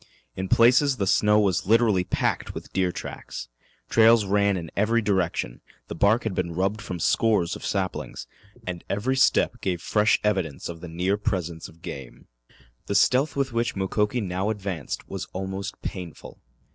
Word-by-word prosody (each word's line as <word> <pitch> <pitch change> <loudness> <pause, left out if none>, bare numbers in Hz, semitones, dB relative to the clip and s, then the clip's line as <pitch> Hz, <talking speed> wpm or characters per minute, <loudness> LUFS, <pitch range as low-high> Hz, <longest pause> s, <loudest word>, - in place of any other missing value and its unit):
In 95 0 -4
places 130 +4 +5
the 100 - 0
snow 105 +2 +4
was 95 -5 +1
literally 110 -4 +4
packed - - -1
with - - -9
deer 90 -1 +1
tracks. - - -7 0.4
Trails 115 -1 +5
ran 100 0 +2
in 85 -3 -6
every 110 +3 +2
direction, 95 - -1 0.3
the - - -4
bark 100 +7 +3
had 110 - -2
been 85 -2 -2
rubbed 100 +4 0
from 90 -5 -5
scores 100 -1 +2
of - - -10
saplings, 95 -2 -3 0.4
and 90 -2 -5
every 115 +7 0
step 135 -2 +2
gave 90 -3 -1
fresh 105 +4 +2
evidence 95 -9 -1
of 85 -1 -8
the 90 - -7
near 90 +5 0
presence 90 -6 -3
of 85 +2 -20
game. 65 -6 -8 0.6
The 100 - -1
stealth 130 +8 +3
with 135 -3 -1
which 115 0 0
Mukoki 105 +5 0
now 95 +1 -2
advanced 95 -8 -4
was 95 -1 -5
almost 95 +2 -5
painful. 90 -5 -7
100 Hz, 165 wpm, -25 LUFS, 90-110 Hz, 0.6 s, places